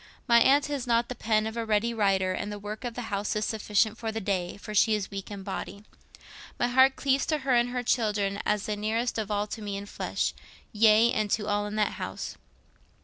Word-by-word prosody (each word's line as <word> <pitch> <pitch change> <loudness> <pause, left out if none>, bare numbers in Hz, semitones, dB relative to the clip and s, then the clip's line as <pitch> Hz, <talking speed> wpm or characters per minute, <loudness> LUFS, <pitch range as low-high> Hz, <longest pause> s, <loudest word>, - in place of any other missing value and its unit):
My 235 -1 +6
aunt 275 +4 +4
has 280 -4 -3
not 235 0 +2
the - - -3
pen 215 -2 +1
of 220 +1 -4
a 230 - -2
ready 220 +1 +1
writer, 195 -4 +2
and 205 +2 -4
the 205 - -5
work 210 +3 -7
of 240 -2 -4
the 245 - -4
house 200 +2 -1
is 215 0 0
sufficient 215 0 0
for 225 -1 -3
the 225 - -3
day, 190 -4 -2
for 215 +1 -8
she 215 +1 +4
is 205 -1 -4
weak 195 -1 -6
in 200 -2 -7
body. 200 +1 -6 0.7
My 245 - +1
heart 260 +2 +5
cleaves 275 -1 +1
to 310 - +1
her 265 - +2
and 240 0 +3
her 250 0 -3
children 210 -4 0
as 210 -1 0
the 215 -2 -2
nearest 225 +3 -1
of 215 -2 -3
all 205 0 0
to 215 +1 -7
me 205 -1 -4
in 200 - -5
the 205 - -12
flesh—yea, 220 +2 +1
and 215 -1 0
to 210 +1 0
all 205 0 0
in 210 - -5
that 215 -1 +1
house. - - -5
215 Hz, 235 wpm, -28 LUFS, 205-235 Hz, 0.7 s, My